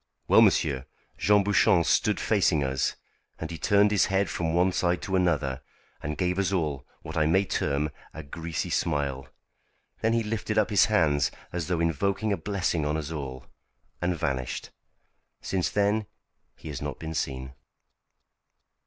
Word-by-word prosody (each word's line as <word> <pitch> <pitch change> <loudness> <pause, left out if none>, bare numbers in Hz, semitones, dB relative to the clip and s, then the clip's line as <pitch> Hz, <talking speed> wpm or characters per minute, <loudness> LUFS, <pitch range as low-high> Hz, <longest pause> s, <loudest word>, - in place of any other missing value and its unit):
Well, - - +7
monsieur, 65 -2 +2 0.3
Jean 105 0 +4
Bouchon 100 -2 +4
stood 105 +5 +2
facing 90 -8 +2
us, 65 -1 0 0.4
and 80 0 -6
he 85 - -6
turned 100 +1 +4
his 100 - +3
head 95 +1 +1
from 80 -1 -1
one 90 +3 +3
side 90 -1 +1
to 95 - -1
another, 75 -8 +1 0.4
and 75 +1 -4
gave 90 0 0
us 100 0 +1
all 75 -7 -1 0.2
what - - -7
I 80 -1 +2
may 95 +5 +3
term 75 -3 -1 0.2
a 80 - -8
greasy 80 +3 -4
smile. 70 -4 -1 0.7
Then 115 +1 +2
he 115 0 +2
lifted 110 0 -3
up 110 0 +2
his 105 - +6
hands 75 -9 +2 0.2
as 85 -3 -3
though 90 -2 0
invoking 95 +6 0
a - - -1
blessing 90 -2 -1
on 75 +1 0
us 80 0 -5
all, 65 -4 -6 0.6
and 90 0 0
vanished. 65 -4 -3 0.7
Since 95 -2 -1
then 105 +1 +1 0.5
he - - -10
has 70 - -5
not 75 -3 -4
been 80 0 -6
seen." 65 -3 -3
85 Hz, 160 wpm, -27 LUFS, 75-100 Hz, 0.7 s, Well